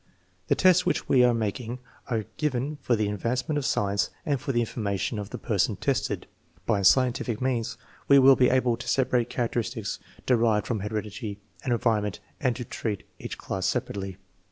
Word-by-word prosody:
"The - - +3
tests 185 -1 +5
which 180 - 0
we 125 -2 +5
are 125 - +6
making 115 +2 -2 0.3
are 115 -4 -1
given 145 0 -1
for 120 - +2
the 105 -2 0
advancement 125 - -1
of 140 - -4
science 100 -3 +1 0.2
and 140 -4 0
for - - -2
the 120 - +1
information 105 -2 -2
of 100 - -5
the - - -5
person - - 0
tested. - - -1 0.4
By 105 -2 +2
scientific 120 +2 +3
means 125 -3 -1 0.3
we 140 - +7
will 135 0 +8
be 125 -1 +4
able 125 -2 +2
to 120 - -8
separate 125 -1 +2
character 120 -1 -1
istics 115 -3 -4 0.3
derived 115 -4 +3
from 115 -4 -1
heredity 105 +1 -4 0.3
and 130 - -1
environment 110 -4 +1 0.2
and 125 -5 +1
to 125 - -5
treat 105 -2 -4 0.2
each - - -6
class 95 -1 -2
separately. 95 -1 -2
120 Hz, 180 wpm, -27 LUFS, 105-130 Hz, 0.4 s, will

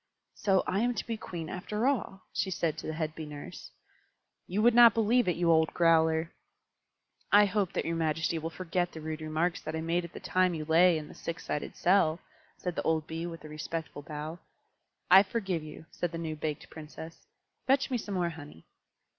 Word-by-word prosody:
"So 195 -4 +2
I 185 +2 0
am 240 +2 +1
to - - -3
be 230 - -2
Queen 170 -6 -6
after 210 +6 -3
all," 210 -8 -1
she - - -1
said 165 -3 -1
to - - -7
the 155 - -2
head 155 -1 -2
Bee 160 -1 -7
Nurse. 145 -1 -9 0.8
"You 200 +4 0
would 240 0 +6
not 235 -2 +8
believe 230 +1 +3
it, 180 - +2
you 170 -1 +2
old 160 -1 +4
growler!" 160 -1 +3 1.0
"I 205 0 +7
hope 200 -2 0
that - - -1
your 165 - -1
majesty 160 0 0
will 160 +1 -4
forget 175 +1 -2
the 160 - -7
rude 155 0 -5
remarks 155 +3 -1
that 155 - -5
I 160 - -2
made 170 +2 0
at 170 - -9
the - - -7
time 185 -1 +1
you 155 -1 -4
lay 165 +2 +5
in 150 -1 -6
the - - -12
six 170 - -6
sided 150 - -3
cell," 175 -3 +3 0.4
said 180 -2 -4
the - - -1
old 160 -1 0
Bee, 165 +2 -4
with 165 -2 -8
a - - -8
respectful 155 0 -5
bow. 150 +3 -6 0.7
"I 190 +1 +10
forgive 195 -4 -2
you," 155 +1 -10
said 175 - -3
the 165 - -5
new 160 -2 -4
baked 150 -1 -5
Princess. 160 +1 -10 0.4
"Fetch 270 +1 +3
me 250 - +1
some 205 -2 -5
more 175 -2 +1
honey." 145 - -11
165 Hz, 210 wpm, -30 LUFS, 160-190 Hz, 1.0 s, I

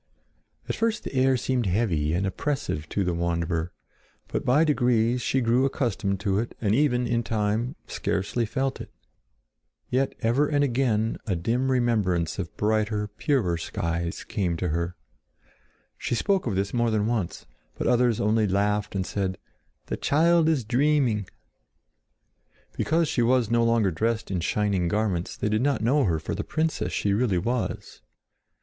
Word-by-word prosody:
At - - -2
first 225 -1 0
the - - -6
air 130 0 +3
seemed 125 -3 -1
heavy 90 -7 +1
and 90 +3 0
oppressive 95 - -2
to 100 - 0
the 90 -1 0
wanderer; 85 0 -1 0.6
but - - -2
by 140 +6 +4
degrees 125 -5 +2
she 130 +2 +1
grew 120 +2 +3
accustomed 115 -8 -1
to 100 -2 +1
it 115 - -4
and 105 -2 +1
even, 125 -2 +2
in 120 0 +1
time, 110 +4 -1
scarcely 105 +4 -2
felt 135 +3 -2
it. - - -8 1.0
Yet 135 +2 +1
ever 125 +6 +2
and 145 -1 +2
again 120 -4 +1
a 95 - +1
dim 120 +10 0
remembrance 105 -10 +1
of 90 -3 -5
brighter, 105 0 0
purer 105 - 0
skies 85 +1 -3
came 90 -5 -2
to 90 +1 -2
her. 85 +3 -2 1.0
She - - -1
spoke 190 - +1
of 105 - -1
this 100 +1 -1
more 120 -1 +2
than 110 -2 +1
once; 110 -6 -2 0.3
but - - -4
others 120 -2 +3
only 105 +1 +2
laughed 100 +2 0
and 95 -1 -1
said: 95 -2 -2 0.5
"The - - -3
child 165 +2 +3
is 150 -6 +1
dreaming!" 125 -4 +1 1.5
Because 165 +1 +1
she 125 - 0
was 120 -1 +2
no 120 0 +3
longer 115 -4 +3
dressed 110 +5 -1
in 95 - 0
shining 100 0 0
garments, 100 -3 -1
they - - -1
did 110 +1 +1
not 135 -4 +1
know 135 +5 +3
her 85 -5 +1
for 80 - -4
the 100 +4 -3
princess 160 0 -1
she 100 - 0
really 105 -3 +1
was. 120 +6 -3
110 Hz, 160 wpm, -26 LUFS, 95-125 Hz, 1.5 s, by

